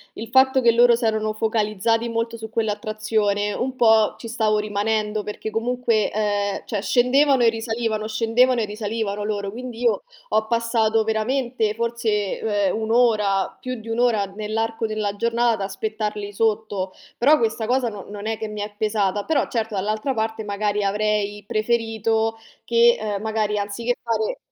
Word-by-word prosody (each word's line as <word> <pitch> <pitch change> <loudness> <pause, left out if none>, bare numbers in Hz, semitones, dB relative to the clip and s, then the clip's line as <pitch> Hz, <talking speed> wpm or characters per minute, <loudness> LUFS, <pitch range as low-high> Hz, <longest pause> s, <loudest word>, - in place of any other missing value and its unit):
il 225 - -6
fatto 265 +2 +4
che 235 -2 +4
loro 240 +1 +6
s'erano 220 -2 0
focalizzati 220 +1 0
molto 230 0 -2
su 220 -1 -8
quell'attrazione, 215 -1 -1
un 260 +3 -3
po' 220 -3 +4
ci 230 - -7
stavo 220 -2 +1
rimanendo, 210 0 -1
perché 210 +1 -5
comunque, 230 -1 0
ehm, 205 -1 -1
cioè 205 -3 -3
scendevano 255 +5 +3
e 230 - +6
risalivano, 225 -1 -2
scendevano 235 +3 +2
e 220 - +1
risalivano 210 -1 -3
loro, 205 -1 -2
quindi 245 +1 -7
io 230 -3 +2 0.3
ho 220 0 +1
passato 225 -1 +1
veramente, 225 0 0
forse, 230 -3 -1
v - - -1
ehm, 205 -2 +1
1 220 0 -2
ora, 210 -5 +2
più 255 0 -5
di 220 - -13
1 225 +1 -2
ora 230 -5 +3
nell'arco 220 +3 -3
della 215 -2 -2
giornata 235 +2 +1
ad 210 - -4
aspettarli 210 +1 -3
sotto. 210 -3 -1 0.3
Però 290 +6 +5
questa 225 -2 -1
cosa 250 +1 +1
no 205 -4 -6
non 205 +1 -6
è 225 0 -1
che 220 - -5
mi 210 0 -6
è 205 0 -4
pesata, 205 -2 0
però, 300 +1 +1
certo, 225 -2 -2
dall'altra 215 +7 -1
parte 220 -1 -2
magari 205 0 -1
avrei 210 0 0
preferito 225 0 0 0.3
che, 235 0 +5
ehm, 210 -2 -3
magari 215 -1 -1
anziché 210 +4 -2
fare 220 -2 -1
220 Hz, 165 wpm, -22 LUFS, 210-230 Hz, 0.3 s, loro